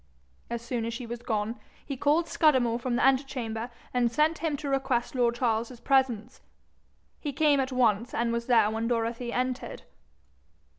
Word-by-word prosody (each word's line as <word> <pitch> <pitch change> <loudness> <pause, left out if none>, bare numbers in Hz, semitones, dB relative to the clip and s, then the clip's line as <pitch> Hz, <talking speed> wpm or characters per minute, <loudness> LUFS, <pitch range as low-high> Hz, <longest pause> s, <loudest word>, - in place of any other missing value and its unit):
As 235 0 -4
soon 235 -1 -2
as 230 0 -3
she 245 - -6
was 235 0 -6
gone, 220 0 -2 0.3
he 280 - -4
called 300 +6 +2
Scudamore 255 -8 +3
from 245 0 -1
the - - +1
antechamber, 255 -4 0 0.2
and 245 -2 +2
sent 305 +6 +2
him 315 -3 -1
to 290 - -6
request 265 -3 0
lord 240 -2 +2
Charles's 235 0 -1
presence. 255 -5 +1 0.8
He 295 - -3
came 290 0 +3
at 265 0 -1
once, 235 -2 +2
and 235 0 0
was 235 0 -2
there 230 -4 +4
when 225 +1 -2
Dorothy 235 0 -1
entered. 255 +1 -3
245 Hz, 165 wpm, -28 LUFS, 230-270 Hz, 0.8 s, there